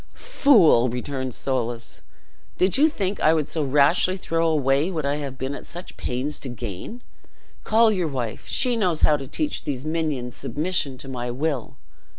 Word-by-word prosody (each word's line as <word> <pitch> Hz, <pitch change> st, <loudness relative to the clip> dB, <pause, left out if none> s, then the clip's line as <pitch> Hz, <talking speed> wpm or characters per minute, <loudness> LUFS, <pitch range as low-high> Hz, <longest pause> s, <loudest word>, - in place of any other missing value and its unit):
"Fool!" 205 Hz, -, +4 dB
returned 130 Hz, +1 st, -4 dB
Soulis, 120 Hz, -3 st, -2 dB, 0.6 s
"did 185 Hz, +1 st, +2 dB
you 300 Hz, +4 st, +5 dB
think 200 Hz, -8 st, -3 dB
I 160 Hz, +1 st, +4 dB
would 155 Hz, -3 st, 0 dB
so 160 Hz, -, -3 dB
rashly 145 Hz, +7 st, +3 dB
throw 165 Hz, -2 st, 0 dB
away 145 Hz, +1 st, +2 dB
what 160 Hz, -6 st, -3 dB
I 140 Hz, +1 st, 0 dB
have 140 Hz, -3 st, -6 dB
been 130 Hz, +2 st, -3 dB
at -, -, -9 dB
such 175 Hz, +1 st, -9 dB
pains 130 Hz, +4 st, -3 dB
to 135 Hz, -, -6 dB
gain? 120 Hz, -, -7 dB, 0.6 s
Call 225 Hz, 0 st, +4 dB
your 185 Hz, -5 st, 0 dB
wife; 125 Hz, -6 st, -4 dB
she 250 Hz, -2 st, +2 dB
knows 180 Hz, -8 st, 0 dB
how 150 Hz, -, +5 dB
to 135 Hz, -2 st, -6 dB
teach 300 Hz, -, -2 dB
these 135 Hz, -1 st, -4 dB
minions 155 Hz, -6 st, -2 dB
submission 150 Hz, -4 st, -2 dB
to 135 Hz, -, -9 dB
my 125 Hz, -2 st, -4 dB
will." 135 Hz, 0 st, -3 dB
145 Hz, 170 wpm, -23 LUFS, 130-180 Hz, 0.6 s, you